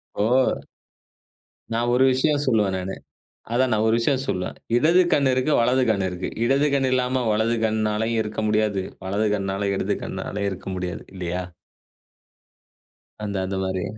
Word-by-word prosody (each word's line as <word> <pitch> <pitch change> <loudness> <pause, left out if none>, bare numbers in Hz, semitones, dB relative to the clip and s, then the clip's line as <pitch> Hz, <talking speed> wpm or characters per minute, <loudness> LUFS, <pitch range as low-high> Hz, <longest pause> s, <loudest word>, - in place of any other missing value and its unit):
இப்போ 125 +5 +2 1.1
நான் 120 +1 +1
ஒரு 130 +1 +4
விஷயம் 145 +3 +1
சொல்லுவேன் 105 -6 +2
நானு 95 +1 -4 0.6
அதான் 130 +1 +2
நான் 110 0 +2
ஒரு 110 - +3
விஷயம் 130 +2 +1
சொல்லுவேன். 90 -2 -2 0.2
இடது 170 +8 +5
கண் 140 -2 +4
இருக்கு 130 +4 +1
வலது 125 +2 +3
கண் 100 -3 +1
இருக்கு. 90 0 -4 0.2
இடது 140 +4 +3
கண் 135 -2 +2
இல்லாம 125 0 +1
வலது 110 +2 +1
கண்ணாலயும் 110 +1 0
இருக்க 105 0 -4
முடியாது. 105 -2 +1 0.2
வலது 100 +3 0
கண்ணால 100 0 -2
இடது - - -1
கண்ணாலயும் 100 0 -3
இருக்க 95 0 -7
முடியாது. 90 -2 -4
இல்லையா? 90 0 -3 1.8
அந்த 100 -2 -3
அது 95 +1 -3
மாதிரி. 95 0 -2
110 Hz, 145 wpm, -23 LUFS, 95-130 Hz, 1.8 s, இடது